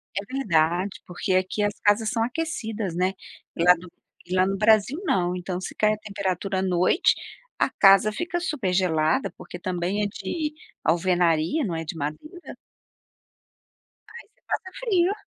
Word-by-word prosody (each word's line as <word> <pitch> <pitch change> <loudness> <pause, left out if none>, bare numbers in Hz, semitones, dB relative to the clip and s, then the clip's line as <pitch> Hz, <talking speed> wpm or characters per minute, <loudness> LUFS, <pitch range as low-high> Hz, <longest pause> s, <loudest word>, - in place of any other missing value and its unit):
É 200 - -1
verdade 180 -5 +1
porque 185 +2 -2
aqui 185 +3 0
as 205 0 +1
casas 210 +1 +3
são 230 -2 0
aquecidas 230 - -3
né, 185 +2 +1 0.4
lá 180 +1 +6
no 175 +1 -13 0.4
e 185 - -1
lá 185 0 +4
no 195 0 -1
Brasil 220 - +3
não 180 - +1
então 180 0 -4
se - - -6
cair 215 0 +2
a 215 - -4
temperatura 195 -2 -3
à - - 0
noite, 185 - +3 0.4
a - - +2
casa 195 +1 +5
fica 350 - -3
super 260 - -1
gelada 160 -4 +1
porque - - -9
também 185 +2 -2
é - - +1
de 300 - -4 0.3
alvenaria, 175 - +2
não 180 - -3
é 165 0 -4
de 160 - -5
madeira. 160 - -6 1.6
Aí 475 - -11
você - - -39
passa 375 - -3
frio. 390 -6 +2
195 Hz, 160 wpm, -25 LUFS, 180-225 Hz, 1.6 s, lá